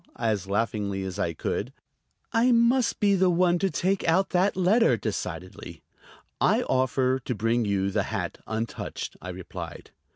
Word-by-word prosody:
as 110 -5 -1
laughingly 100 -1 -1
as 95 -1 -5
I 85 - 0
could. - - -3 0.6
"I 235 +3 +4
must 235 0 +3
be 205 -1 +3
the 190 -1 +3
one 175 0 +3
to 195 - +1
take 190 +2 0
out 185 +4 +2
that 185 +2 +2
letter," 210 +6 +4
decidedly. - - -6 0.6
"I 230 +4 +3
offer 130 - +1
to 125 -1 -4
bring 115 +2 +1
you 100 -1 0
the - - +1
hat - - -3
untouched," 115 +1 -4
I - - -7
replied. - - -8
130 Hz, 155 wpm, -26 LUFS, -, 0.6 s, I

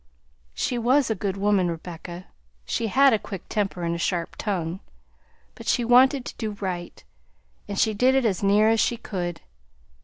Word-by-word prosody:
"She 245 - -1
was 255 +2 +3
a - - +3
good 200 -1 -3
woman, 195 -3 +2
Rebecca; 170 +1 -7 0.4
she 225 - -1
had 270 +4 +5
a 220 - +2
quick 195 -3 -8
temper 195 -4 -2
and 170 0 0
a 170 - -4
sharp 170 -1 -2
tongue, 180 -4 -3 0.7
but - - -12
she 240 - +2
wanted 255 +2 +5
to - - -6
do 215 -3 -4
right, 180 -3 -5 0.6
and 200 -1 -5
she 220 0 +2
did 255 +5 +3
it 265 -2 +2
as 195 -5 0
near 205 +2 +4
as 225 0 +3
she 235 - +1
could. 180 -6 -5
205 Hz, 180 wpm, -25 LUFS, 180-235 Hz, 0.7 s, had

